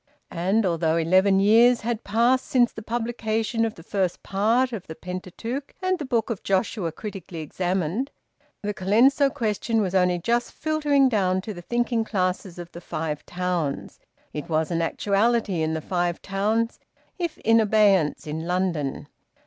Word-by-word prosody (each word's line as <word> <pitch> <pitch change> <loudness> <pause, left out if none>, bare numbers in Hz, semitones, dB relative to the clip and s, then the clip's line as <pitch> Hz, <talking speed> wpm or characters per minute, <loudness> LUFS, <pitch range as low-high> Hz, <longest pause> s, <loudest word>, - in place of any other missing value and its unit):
And, 195 +6 +1
although 165 -2 +1
eleven 190 +4 +4
years 230 +4 +5
had 230 0 -2
passed 235 +5 +2
since 245 -2 +3
the 220 - -7
publication 225 0 -1
of 225 - -4
the 165 - -13
first 190 -1 -2
part 230 +6 +1
of 205 -6 -6
"The 160 - -7
Pentateuch 185 - -6
and 370 -1 0
the 300 - -4
Book 235 -3 0
of 215 - -4
Joshua 190 -2 0
Critically 190 -2 -8
Examined," 180 - -2 0.5
the 210 0 -1
Colenso 240 +9 +4
question 225 0 -1
was 190 -4 -1
only 180 -1 +3
just 235 +7 -1
filtering 295 -3 +2
down 190 -6 +1
to 215 +2 -6
the 175 - -9
thinking 240 +3 0
classes 185 -3 -2
of 175 0 -8
the 170 - -10
Five 155 -3 -4
Towns; 175 -5 -3 0.3
it 150 +3 -6
was 160 0 0
an 170 -1 0
actuality 205 +1 +1
in 160 0 0
the 160 - -3
Five 175 0 -1
Towns, 215 +4 0 0.4
if 340 -3 -2
in 225 +1 +4
abeyance 205 -7 +3
in 160 +2 -4
London. 175 -6 -1
200 Hz, 160 wpm, -24 LUFS, 175-230 Hz, 0.5 s, years